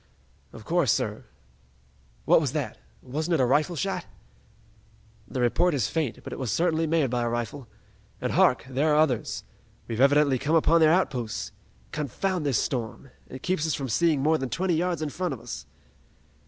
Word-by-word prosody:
"Of - - -12
course, - - +2
sir! - - -2 1.0
What - - +5
was 140 -4 -2
that? 150 -4 -3 0.2
Wasn't 155 +6 -1
it - - 0
a 130 - +4
rifle 150 +7 +2
shot?" 195 +5 -2 1.2
"The 130 - -3
report 160 +8 +2
is 125 -7 0
faint, 155 -8 -2
but - - -7
it - - -7
was 130 -5 -2
certainly 165 - +1
made 155 -5 +1
by 125 -1 0
a 120 - 0
rifle. 120 +2 -4 0.5
And - - -2
hark, - - +3
there 140 +4 +1
are - - +3
others! 145 -7 +1 0.4
We've 115 +1 -2
evidently 140 -1 +4
come 150 +5 +1
upon 165 +1 +4
their 155 -1 +6
outposts! 125 - -1 0.4
Confound 160 +3 -2
this 135 - +2
storm! 120 +1 -3 0.2
It 130 - -9
keeps 180 -4 0
us 160 - 0
from 135 -2 -4
seeing 155 +3 +2
more 155 +1 +3
than 130 - -3
twenty 180 +8 0
yards 170 -1 0
in 155 - -2
front 175 -1 -3
of - - -13
us!" - - -8
145 Hz, 180 wpm, -26 LUFS, 130-165 Hz, 1.2 s, their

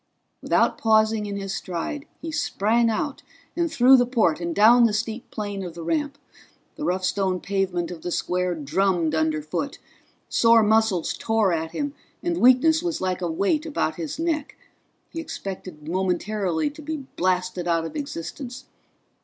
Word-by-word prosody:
Without - - +2
pausing 220 -1 +3
in 200 0 -4
his 195 -1 -4
stride 195 - -4 0.2
he 325 - -4
sprang 235 -6 +1
out 270 +6 -2 0.3
and 340 -1 0
through 255 +2 +7
the 245 - +3
port 220 -10 +2
and 170 -1 -3
down 235 +4 +7
the 220 - +2
steep 220 +2 -3
plane 205 -2 -4
of 175 -3 -7
the 170 - -7
ramp. 295 - -1 0.6
The - - -6
rough 185 -6 0
stone 190 -1 0
pavement 185 -3 -1
of 170 -2 -8
the - - -4
square 180 0 -1
drummed 165 +2 0
underfoot; 155 - -1 0.5
sore 230 -1 +5
muscles 215 -5 +2
tore 220 -5 +1
at 160 0 -3
him, 290 -1 -2 0.3
and 345 -1 0
weakness 265 +6 +5
was 345 -3 -2
like 185 -1 -2
a 175 - -1
weight 200 - +1
about 225 - -1
his 165 -3 -4
neck. 320 -3 -2 0.6
He 330 - -5
expected 185 - -7
momentarily 185 - -1
to 305 +2 -12
be 310 +1 -4 0.2
blasted 180 -1 0
out 165 -1 +1
of 165 - -7
existence. 260 - -6
205 Hz, 160 wpm, -24 LUFS, 180-255 Hz, 0.6 s, through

